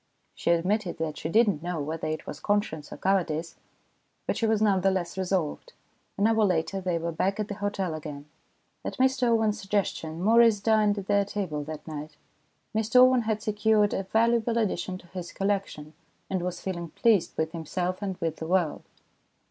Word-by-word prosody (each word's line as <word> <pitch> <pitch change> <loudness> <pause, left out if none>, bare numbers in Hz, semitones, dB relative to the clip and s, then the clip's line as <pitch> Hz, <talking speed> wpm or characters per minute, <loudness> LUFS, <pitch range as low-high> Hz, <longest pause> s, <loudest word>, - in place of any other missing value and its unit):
She - - -3
admitted 180 +3 +1
that 160 -2 -3
she 160 - -3
did 225 +6 +5
not 180 -7 0
know 175 -1 -3
whether 155 +2 -3
it 155 0 -3
was 145 - -7
conscience 205 -8 -1
or - - -7
cowardice, 170 -4 0 0.7
but - - -1
she 230 - 0
was 220 -1 +2
none 200 -3 +3
the 195 - +4
less 180 -3 -2
resolved. 190 - -2 0.4
An 200 - +2
hour 220 0 +4
later 185 0 0
they 180 -2 0
were 170 +1 -2
back 195 +5 -1
at 210 - -2
the - - -2
hotel 200 -4 -1
again. 150 -2 -7 0.6
At - - -5
Mr 260 -1 +2
Owen's 220 -2 +2
suggestion, 195 -5 -2
Maurice 225 0 +5
dined 210 -1 +3
at 200 - -4
their 200 0 +3
table 190 -7 -3
that 155 0 -8
night. 155 -1 -7 0.6
Mr 220 +2 -1
Owen 255 0 +7
had 215 -1 -2
secured 210 0 +2
a - - 0
valuable 230 +3 +2
addition 185 -4 -1
to 180 - -17
his 180 -1 -6
collection, 195 -6 -2 0.4
and 185 -2 0
was 180 0 -4
feeling 170 -3 -4
pleased 215 +1 +2
with 160 0 0
himself 180 +3 -3
and 190 -3 -3
with 165 -1 -2
the 160 - -5
world. 175 -3 +1
190 Hz, 190 wpm, -27 LUFS, 165-215 Hz, 0.7 s, Owen